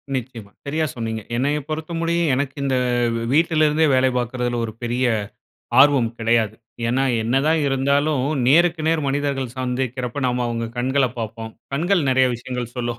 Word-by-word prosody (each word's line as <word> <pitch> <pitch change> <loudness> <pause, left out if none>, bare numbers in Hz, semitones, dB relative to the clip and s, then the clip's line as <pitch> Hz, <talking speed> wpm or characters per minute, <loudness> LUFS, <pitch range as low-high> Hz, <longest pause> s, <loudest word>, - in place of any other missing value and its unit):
நிச்சயமா. 115 -5 -6
சரியா 155 +3 0
சொன்னீங்க. 110 -2 -3
என்னைய 145 +4 +1
பொறுத்தமுடிய 165 +2 -2 0.2
எனக்கு 135 0 -2
இந்த 135 -1 +1 0.4
வெவ் 115 - -1
வீட்ல 160 0 +3
இருந்தே 155 +2 +2
வேலை 130 0 +3
பாக்குறதுல 120 0 -2
ஒரு 110 - -7
பெரிய 120 +2 0 0.8
ஆர்வம் 135 -5 +5
கெடையாது. 115 -2 +1 0.3
ஏன்னா 130 +3 +1 0.2
என்ன 120 +4 0
தான் 160 0 +3
இருந்தாலும் 140 +1 +1 0.2
நேருக்கு 170 +4 +4
நேர் 160 -1 +1
மனிதர்கள் 135 -3 -2
சந்திக்கிறப்ப 130 0 -3
நம்ம 125 0 0
அவுங்க 115 -1 -2
கண்கள 130 +2 +2
பாப்போம். 110 0 -5 0.2
கண்கள் 175 +5 +1
நெறைய 130 0 +4
விஷயங்கள் 120 0 -5
சொல்லும். 120 -1 -3
130 Hz, 150 wpm, -21 LUFS, 120-145 Hz, 0.8 s, ஆர்வம்